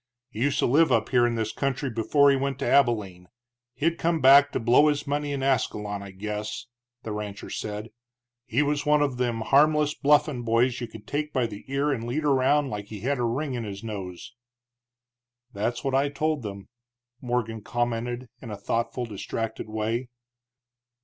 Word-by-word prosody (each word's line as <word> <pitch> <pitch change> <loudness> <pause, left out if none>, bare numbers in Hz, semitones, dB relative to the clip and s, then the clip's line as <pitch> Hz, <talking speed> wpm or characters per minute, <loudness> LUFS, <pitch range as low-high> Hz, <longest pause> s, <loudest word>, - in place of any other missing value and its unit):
"He 110 - -6
used 140 +1 +1
to - - +2
live 155 +6 +4
up 110 -1 +2
here 120 -2 +4
in 120 - -1
this 110 -1 -1
country 135 -1 -2
before 140 +6 +4
he - - +3
went 135 0 -1
to 140 - -3
Abilene; 105 -9 +2 0.5
he'd 165 +2 0
come 165 0 +1
back 140 +1 +7
to - - -1
blow 120 +6 +5
his 145 -1 0
money 145 0 -2
in 140 -1 -2
Ascalon, 105 -6 0
I 100 - -8
guess," 105 +3 -5 0.4
the 110 - -5
rancher 105 -1 -6
said. 105 +1 -5 0.6
"He 125 +4 +2
was 145 0 0
one 150 0 +3
of 135 -4 -1
them 120 -2 -1
harmless 150 +4 +3
bluffin' 145 -3 +2
boys 120 +2 +1
you 120 - -3
could 110 -1 -12
take 150 +1 -3
by 130 -4 +1
the 105 -3 -7
ear 140 +2 0
and 115 -4 -2
lead 145 +6 -2
around 140 0 +3
like 105 -1 -4
he 105 -1 -9
had 135 +3 -1
a - - 0
ring 130 +5 -1
in 120 -2 -3
his 100 -1 -7
nose." 95 -3 -7 1.2
"That's 110 +4 -2
what 135 -1 -1
I 135 +2 +2
told 155 +1 -1
them," 100 -3 -8 0.5
Morgan 120 -3 -2
commented, 120 +2 -2
in 120 - -8
thoughtful, 115 +4 -2
distracted 110 +1 -5
way. 110 +3 -2
120 Hz, 185 wpm, -26 LUFS, 110-140 Hz, 1.2 s, back